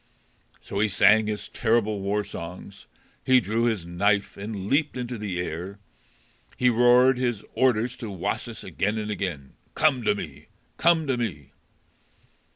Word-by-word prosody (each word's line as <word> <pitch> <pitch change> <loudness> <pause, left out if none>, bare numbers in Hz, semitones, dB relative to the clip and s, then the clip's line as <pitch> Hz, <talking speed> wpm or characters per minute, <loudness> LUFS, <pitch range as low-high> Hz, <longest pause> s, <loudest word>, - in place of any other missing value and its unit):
So 100 - -5
he 110 - +3
sang 105 +2 +4
his 105 -1 -4
terrible 110 -3 0
war 100 +2 -1
songs; 95 +1 -9 0.4
he 130 -1 +5
drew 115 +2 0
his 110 -7 0
knife 100 +4 0
and 100 -1 -6
leaped 145 +3 +1
into 125 0 -4
the 100 -4 -3
air; 90 +3 -5 0.8
he 125 -1 +3
roared 125 +2 +5
his 120 -5 -1
orders 125 -1 +2
to 115 - -6
Wasis 95 -3 -4
again 105 +3 -2
and 105 -1 -3
again. 85 -10 -4 0.2
"Come 150 -5 +3
to - - +3
me: - - -8 0.3
come 165 -2 +3
to 135 -3 0
me!" 80 - -4
105 Hz, 150 wpm, -25 LUFS, 100-125 Hz, 0.8 s, he